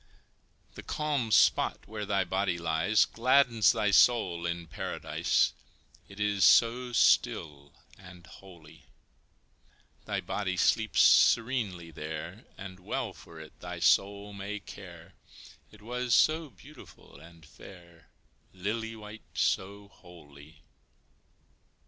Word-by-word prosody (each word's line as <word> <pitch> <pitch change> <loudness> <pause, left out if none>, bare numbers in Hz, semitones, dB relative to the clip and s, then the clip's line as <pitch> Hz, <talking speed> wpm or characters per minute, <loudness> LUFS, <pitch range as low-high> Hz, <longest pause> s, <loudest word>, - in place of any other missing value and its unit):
The - - -10
calm 145 -6 -2
spot - - +2
where 105 -1 -6
thy 100 -2 +1
body 95 0 -1
lies 85 +5 +1
Gladdens 120 -2 +3
thy 105 - 0
soul 95 -6 +3
in 85 0 -4
Paradise, 75 - -1 0.6
It 100 - -13
is 105 -1 0
so 120 +2 +4
still 70 -10 +1 0.3
and 90 -2 -14
holy; 85 -6 -16 1.2
Thy - - -2
body 95 -3 -3
sleeps 110 +3 +2
serenely 110 -9 +3
there, 80 +6 -8
And 95 -2 -10
well 90 - -4
for 80 -1 -14
it 80 -1 -14
thy 90 0 -7
soul 100 +4 +1
may 100 +1 -6
care, 90 -3 -13 0.6
It 105 -1 -18
was 125 +1 -1
so 155 0 +2
beautiful 95 -9 -16
and 85 -1 -16
fair, 85 +2 -16 0.5
Lily 110 +4 -4
white 105 0 -11
so 100 +2 -1
wholly. 75 -4 -17
95 Hz, 110 wpm, -29 LUFS, 85-110 Hz, 1.2 s, so